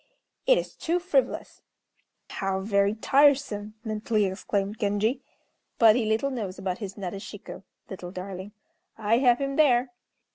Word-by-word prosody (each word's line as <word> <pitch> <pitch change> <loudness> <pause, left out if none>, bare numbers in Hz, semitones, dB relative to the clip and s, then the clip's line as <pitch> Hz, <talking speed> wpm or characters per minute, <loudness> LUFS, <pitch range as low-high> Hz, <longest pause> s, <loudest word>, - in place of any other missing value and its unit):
It - - +6
is - - -3
too 335 +2 0
frivolous!" 375 +8 -1 0.7
"How 195 0 -2
very 200 0 +2
tiresome!" 260 -5 +2
mentally 215 -1 0
exclaimed 200 +2 -2
Genji; 215 +6 0 0.6
"but 220 -2 +7
he 235 -3 0
little 225 +6 +1
knows 205 -7 -4
about 190 -1 -3
his 195 -3 -6
Nadeshiko 200 +1 -7 0.3
(little 180 -2 -7
darling). 190 +1 -7 0.5
I 220 +2 +2
have 245 -2 +5
him 275 0 -3
there!" 255 -4 +4
215 Hz, 135 wpm, -26 LUFS, 195-250 Hz, 0.7 s, but